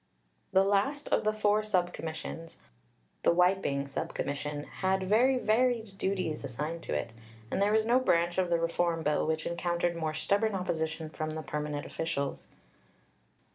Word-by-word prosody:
The 190 - +5
last 205 +9 +1
of - - +2
the 215 - +3
four 215 0 +2
Sub 185 -5 0
Commissions 165 +1 -6 0.6
the - - +4
"wiping" 180 -6 +2
Sub 140 - -4
Commission 145 +1 -3
had 190 +4 -1
very 240 +7 +4
varied 225 -3 +1
duties 185 -6 -1
assigned 150 +6 -4
to - - -2
it, 115 - -3 0.4
and - - 0
there 205 +1 +3
was 220 0 +3
no 240 +3 +4
branch 175 -7 +2
of 180 -2 +1
the 170 -1 +2
reform 165 0 0
bill 150 0 +1
which 160 0 -1
encountered 170 0 0
more 160 -2 -2
stubborn 200 +5 +1
opposition 160 -3 -2
from 155 -1 -3
the 155 0 -4
permanent 150 -1 -3
officials. 140 -4 -3
175 Hz, 160 wpm, -30 LUFS, 155-200 Hz, 0.6 s, The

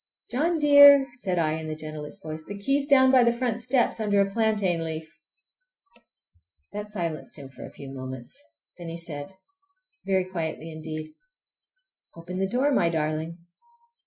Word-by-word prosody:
"John 325 +7 +1
dear!" 285 -2 +8
said 185 -6 -2
I 160 -2 +2
in 160 - -6
the 155 - -4
gentlest 155 -1 -8
voice, 155 0 -6
"the 205 +5 -8
key 275 +8 +1
is 280 - -4
down 260 -2 +6
by 255 -2 +6
the 235 - +4
front 235 -1 -2
steps, 245 0 +1
under 205 -2 +1
a 200 - +4
plantain 200 -5 0
leaf!" 160 -1 -6 1.6
That 210 0 -5
silenced 170 -8 -4
him 140 -2 -10
for 135 - -10
a - - -14
few 135 -1 -10
moments. 130 -2 -8 0.4
Then 170 -1 -7
he 165 - -5
said—very 195 - -6
quietly 165 -3 -4
indeed, 155 0 -7 1.0
"Open 175 +2 -7
the 190 0 0
door, 260 +6 +1
my 175 -11 +3
darling!" 160 +1 -3
185 Hz, 160 wpm, -26 LUFS, 155-245 Hz, 1.6 s, dear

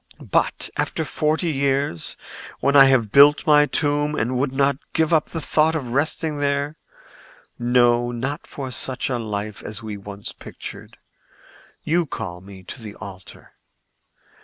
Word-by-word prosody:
But - - +1
after - - -1
forty 155 +2 0
years, 135 - -1 0.4
when 140 +1 +1
I 135 -1 +9
have 125 -6 +3
built 145 +2 +6
my 150 -1 +5
tomb 145 0 +1
and 125 +1 -1
would 130 +2 0
not 135 0 +1
give 160 +1 +2
up 155 -2 +3
the 165 - -4
thought 160 +1 +2
of 135 -6 -3
resting 150 +3 0
there—no, 125 -4 -1
not 130 +5 -4
for 135 -2 -6
such 130 +1 0
a 125 - -1
life 105 -2 -4
as 105 +1 -7
we 105 -2 -5
once 100 0 -7
pictured—you 170 +1 -7
call 90 -8 -6
me 95 -1 -13
to 120 +7 -9
the 105 -2 -8
altar. 95 -1 -11
135 Hz, 140 wpm, -22 LUFS, 110-145 Hz, 0.4 s, I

